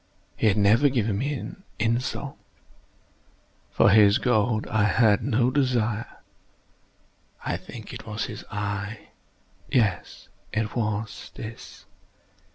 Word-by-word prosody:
He 110 - +1
had 100 - +3
never 110 +8 +5
given 110 -6 0
me 140 +2 -3 0.2
insult. 115 +3 -1 1.3
For 100 - +4
his 105 +1 +6
gold 115 -4 +1
I 105 -1 +1
had 105 0 +4
no 120 +2 +2
desire. 120 -5 -1 1.2
I - - 0
think - - -9
it - - -9
was - - -3
his - - -7
eye! 105 +1 -4 0.6
yes, 110 -8 0 0.2
it 110 -1 -2
was 110 -2 -3
this! 110 +1 -9
110 Hz, 110 wpm, -25 LUFS, 105-120 Hz, 1.3 s, his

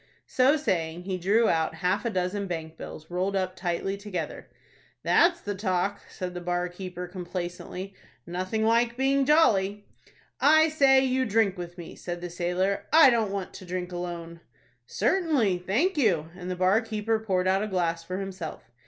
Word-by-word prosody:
So 265 +4 +3
saying, 170 - -1
he 185 -1 -3
drew 215 +6 +3
out 160 -1 +1
half 185 +5 0
a - - +1
dozen 195 0 -2
bank 160 -2 -5
bills, 160 0 -10
rolled 185 +3 -1
up 185 -1 -1
tightly 185 +2 -2
together. 190 -6 -5 0.5
"That's 340 0 +4
the 205 - -3
talk," 195 0 -1
said 185 -2 -5
the 180 - -6
bar 175 0 -1
keeper, 180 0 -7
complaisantly. 180 +1 -6 0.3
"Nothing 185 +5 -2
like 235 +1 +2
being 270 +1 +2
jolly." 205 -10 +3 0.5
"I 315 +2 +6
say, 270 -3 +5
you 260 0 +1
drink 215 -2 +2
with 175 -1 -8
me," 170 - -9
said 175 -1 -6
the 175 0 -6
sailor. 180 +3 -1
"I 310 -3 +8
don't 225 -3 +1
want 195 -2 -4
to - - -10
drink 180 0 -4
alone." 170 -1 -6 0.5
"Certainly, 245 - +1
thank 310 - +1
you;" 170 - +2
and 180 0 -7
the 185 - -2
bar 185 +5 +3
keeper 220 -1 -1
poured 185 -4 0
out 190 +1 +3
a 215 - -1
glass 170 -4 -1
for 185 +2 -5
himself. 190 -10 -7
190 Hz, 170 wpm, -27 LUFS, 180-220 Hz, 0.5 s, I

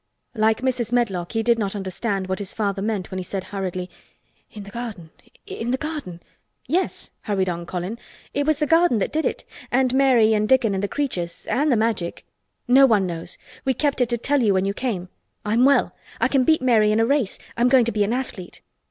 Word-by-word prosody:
Like 220 -1 +2
Mrs. 250 -3 -1
Medlock, 200 -8 0
he 225 -1 0
did 235 0 +3
not 200 -1 -2
understand 195 +1 -2
what 190 +1 -3
his 200 -2 -4
father 200 -2 -1
meant 205 -3 -2
when 185 - -3
he - - -4
said 190 +1 -4
hurriedly: 185 -2 -4 0.6
"In 210 - -9
the 200 - -11
garden! 210 -9 -7 0.3
In 230 - -5
the 260 - +1
garden!" 285 - -6 0.4
"Yes," 355 +8 -1
hurried 195 -4 0
on 170 0 -4
Colin. 185 +6 -4 0.3
"It 285 +1 -1
was 310 -2 +3
the 300 - +1
garden 330 -4 +4
that 200 - -1
did 315 +1 +1
it—and 255 0 -2
Mary 255 -5 +4
and 215 0 +1
Dickon 255 -6 +4
and 190 - -1
the - - +1
creatures—and 265 - -1
the 240 - +3
Magic. 215 -6 -1 0.4
No 270 +2 +7
one 210 -5 +3
knows. 170 -1 -4 0.3
We 265 -1 +1
kept 285 0 0
it 245 - +2
to 240 - 0
tell 275 +4 +1
you 205 -4 +3
when 190 0 +1
you 200 - 0
came. 200 -7 -3 0.4
I'm 225 +4 +3
well, 280 0 +3 0.2
I - - +3
can 265 -3 +2
beat 315 -2 +3
Mary 220 -4 +4
in 215 - +2
a 225 - +4
race. 265 -5 0 0.2
I'm 240 +1 +3
going 255 -2 +5
to 235 - 0
be 210 -2 +1
an 205 - -1
athlete." 240 -8 -5
225 Hz, 215 wpm, -23 LUFS, 195-255 Hz, 0.6 s, No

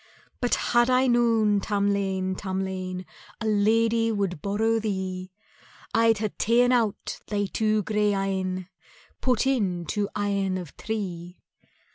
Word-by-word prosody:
"But 245 - +2
had 240 +1 +2
I 255 +1 +4
known, 230 -4 +3
Tamlane, 200 -2 0
Tamlane, 185 -1 -4 0.3
A 225 - -4
lady 225 +2 +2
would 195 -7 -2
borrow 220 +3 +1
thee, 190 -3 -3 0.6
I'd 225 -1 +4
hae 215 0 -1
ta'en 240 +3 +4
out 230 -5 0
thy 205 -1 0
two 215 +1 0
grey 210 0 +1
eyne, 190 -2 -2 0.5
Put 255 0 +2
in 195 -10 0
two 205 +5 -1
eyne 200 -2 0
of 175 -6 -8
tree. 180 -5 -5
205 Hz, 125 wpm, -26 LUFS, 190-225 Hz, 0.6 s, I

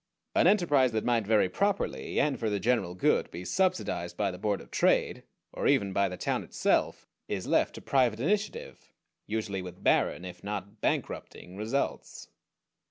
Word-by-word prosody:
An - - +4
enterprise 145 - +4
that 110 - -1
might 115 -4 +1
very 110 -3 +4
properly, 200 - -1
and 140 -3 +1
for 110 - 0
the 105 -1 -1
general 115 -7 0
good, 90 - +2
be 90 +2 -8
subsidized 180 - -1
by 100 -2 0
the 90 - -9
Board 105 -1 0
of - - -14
Trade, - - +2 0.3
or - - -1
even 100 -1 +2
by 100 0 +2
the 90 - -6
town - - -1
itself, - - 0 0.2
is - - -3
left - - +1
to - - -8
private 125 -5 +2
initiative; 210 - -2 0.4
usually 105 -3 -2
with 90 -1 -10
barren, 90 - +2
if 90 -1 -9
not 100 +1 -6
bankrupting, 90 - -3
results. 110 +7 -3
110 Hz, 165 wpm, -29 LUFS, 95-135 Hz, 0.4 s, An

